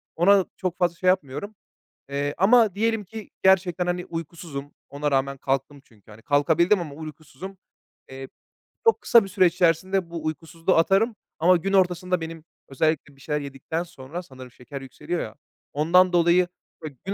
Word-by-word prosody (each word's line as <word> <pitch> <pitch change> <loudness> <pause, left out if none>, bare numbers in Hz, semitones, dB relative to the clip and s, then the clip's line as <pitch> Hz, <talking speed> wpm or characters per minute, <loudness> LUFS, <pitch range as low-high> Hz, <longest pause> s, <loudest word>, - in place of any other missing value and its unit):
Ona 195 +2 +5
çok 185 -1 -3
fazla 175 -2 +1
şey 185 - -3
yapmıyorum. 185 +4 0 0.6
Eee, 145 +1 -2
ama 215 0 +5
diyelim 225 0 0
ki 220 +2 -10
gerçekten, 185 -2 +3
hani, 180 0 -2
uykusuzum. 160 -3 -7 0.2
Ona 145 +1 -2
rağmen 135 0 0
kalktım 135 +2 -2
çünkü, 110 -1 -22
hani, 105 +2 -14
kalkabildim 160 - +3
ama 155 -5 -6
uykusuzum. 155 +4 -10 0.5
Eee, 135 0 -8 0.6
çok 455 - +4
kısa 235 -2 +6
bir 195 - -8
süre 185 -1 +3
içerisinde 180 +1 +1
bu 165 -2 -6
uykusuzluğu 165 +3 -1
atarım. 195 +7 +3 0.2
Ama 180 +3 +5
gün 195 +4 -3
ortasında 180 -1 +2
benim, 165 -1 -7 0.2
özellikle 145 0 -1
bir 135 - -21
şeyler 150 +1 -2
yedikten 140 +4 -4
sonra, 170 +1 -8
sanırım 130 -6 -12
şeker 135 +3 -9
yükseliyor 165 +6 -5
ya, 110 - -7 0.4
ondan 180 +5 +4
dolayı 175 +1 +4 0.6
gün 195 - -2
170 Hz, 160 wpm, -24 LUFS, 145-185 Hz, 0.6 s, kısa